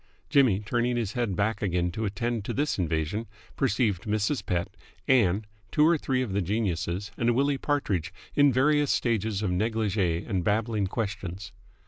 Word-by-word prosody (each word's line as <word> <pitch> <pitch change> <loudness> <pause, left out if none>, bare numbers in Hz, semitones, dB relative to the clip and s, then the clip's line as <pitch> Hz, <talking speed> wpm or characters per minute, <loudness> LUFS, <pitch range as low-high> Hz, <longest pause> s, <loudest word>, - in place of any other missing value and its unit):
Jimmy, 120 -8 +4
turning 120 +3 0
his 110 -4 -2
head 120 -6 -1
back 105 +3 0
again 90 -3 0
to 110 +5 -3
attend 115 +2 -2
to - - -3
this 145 -5 0
invasion, 80 +6 -1 0.3
perceived 110 -6 +1
Mrs. 110 +6 0
Pett, 90 +2 -2 0.3
Ann, 110 -6 +3 0.3
two 150 - +4
or 170 - +5
three 130 -4 0
of 110 -6 -4
the 100 - +1
geniuses, 95 -1 -2
and 120 0 +2
Willie 140 +1 +1
Partridge, 120 - -1 0.2
in 145 -1 +5
various 145 +3 +3
stages 110 -3 0
of 95 - 0
negligee 100 -4 0
and 95 -6 -1
babbling 105 0 0
questions. 100 -3 -4
110 Hz, 160 wpm, -27 LUFS, 95-120 Hz, 0.3 s, or